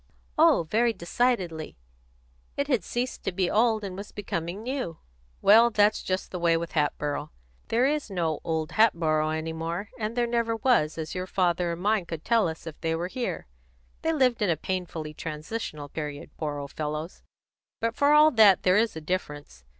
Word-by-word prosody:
"Oh, 310 - +5
very 235 +2 +3
decidedly. 175 - -1 0.8
It 280 - 0
had 250 -10 +1
ceased 245 +5 -3
to - - -1
be 180 0 0
old 220 -1 +2
and 190 -2 -5
was 200 +2 -8
becoming 185 0 -4
new." 250 - -3 0.5
"Well, 230 +3 +7
that's 210 -1 +3
just 185 0 -3
the 180 - -4
way 170 -1 +3
with 170 0 -4
Hatboro'. 150 -1 -1 0.4
There 240 +3 +2
is 295 -2 0
no 170 -5 -1
old 160 -2 -2
Hatboro' 160 -8 +3
any 160 +1 -3
more; 165 +5 -4
and 220 +2 -3
there 240 - +3
never 235 -1 0
was, 225 - +2
as 160 -1 -4
your 185 0 -4
father 175 -2 +1
and 170 - -7
mine 210 -4 +1
could 165 -1 -6
tell 230 -5 +3
us 160 0 -6
if 160 -2 -9
they 165 -1 0
were 175 +2 -3
here. 245 +3 -3 0.6
They 325 - +1
lived 255 -7 +2
in 205 - +2
a 165 - +2
painfully 165 -3 -4
transitional 155 0 -5
period, 150 -1 -6
poor 150 -2 -3
old 140 0 -6
fellows! 155 +2 -5 0.6
But, 230 0 0
for 285 +4 +3
all 300 +1 +7
that, 215 -6 +6
there 185 +1 +4
is 225 -2 +1
a 160 - -6
difference. 150 - -5
185 Hz, 185 wpm, -27 LUFS, 160-230 Hz, 0.8 s, Well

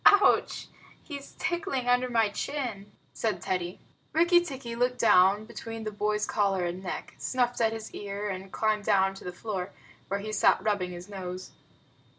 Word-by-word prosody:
"Ouch! 410 0 +5 0.4
He's 280 -3 -8
tickling 275 -8 -1
under 250 +1 +3
my 225 -3 +3
chin," 220 -4 -4 0.2
said 215 -5 -1
Teddy. 180 0 -2 0.3
Rikki 345 +2 +5
tikki 265 -7 -6
looked 250 +1 +1
down 200 0 +5
between 225 0 -7
the 215 - -3
boy's 210 0 0
collar 195 -4 +1
and 175 +2 -3
neck, 185 - -5
snuffed 245 -2 0
at 225 -1 +4
his 225 -1 -6
ear, 205 0 -4
and 190 -1 -5
climbed 215 -1 +1
down 195 -2 +4
to 195 - -11
the 180 - -4
floor, 185 0 -4 0.4
where 200 - -1
he 215 +1 -5
sat 215 - +4
rubbing 200 -4 +1
his 175 +1 -8
nose. 185 -2 -6
210 Hz, 165 wpm, -29 LUFS, 195-245 Hz, 0.4 s, Ouch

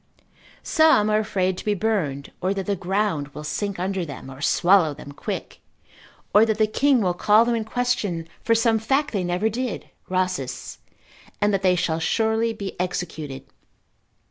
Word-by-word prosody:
Some 315 -10 +4
are 215 - +3
afraid 190 -4 -1
to - - -7
be 210 -1 +1
burned, 175 -10 -1
or 190 +2 0
that 195 -1 -3
the 200 - 0
ground 190 -5 -1
will 150 - -6
sink 200 +6 -3
under 185 +1 -2
them, 140 -4 -8
or 130 +1 -11
swallow 175 -2 +4
them 145 - -10
quick, 145 - -6 0.7
or 210 - +7
that 220 -1 +1
the 215 - +4
king 265 +3 +2
will 180 -3 +1
call 210 +5 +4
them 240 - +1
in 225 -2 -1
question 220 -8 -1
for 230 - +2
some 225 -1 +3
fact 270 +7 0
they 195 -4 -1
never 180 +4 0
did 240 +2 -4 0.2
(Rhasis 185 -8 -2 0.5
cont.) - - -34
and 205 0 +2
that 195 - +1
they 185 -1 +3
shall 165 -2 0
surely 220 +6 +1
be 200 -3 -6
executed. 160 -6 -4
195 Hz, 175 wpm, -23 LUFS, 175-220 Hz, 0.7 s, or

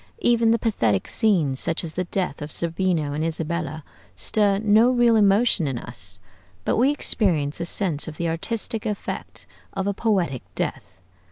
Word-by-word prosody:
Even 235 -1 +3
the 230 - +4
pathetic 115 - 0
scenes, 170 - +2
such 165 +1 0
as 160 -2 -5
the 180 +2 -2
death 180 -5 -2
of 150 +1 -6
Zerbino 165 -3 0
and 150 +2 -2
Isabella, 160 -1 -3 0.3
stir 205 -2 +2
no 215 +3 +4
real 240 -2 +4
emotion 205 -4 +3
in 135 -3 -2
us, 95 -3 -5 0.5
but - - +1
we 250 +4 +4
experience 175 - 0
a 170 - -2
sense 170 -6 0
of 155 -1 -7
the 170 - -1
artistic 215 +6 -2
effect 210 -1 -5 0.3
of 195 - -2
a 200 - 0
poetic 185 - 0
death. - - -4
180 Hz, 165 wpm, -23 LUFS, 155-215 Hz, 0.5 s, the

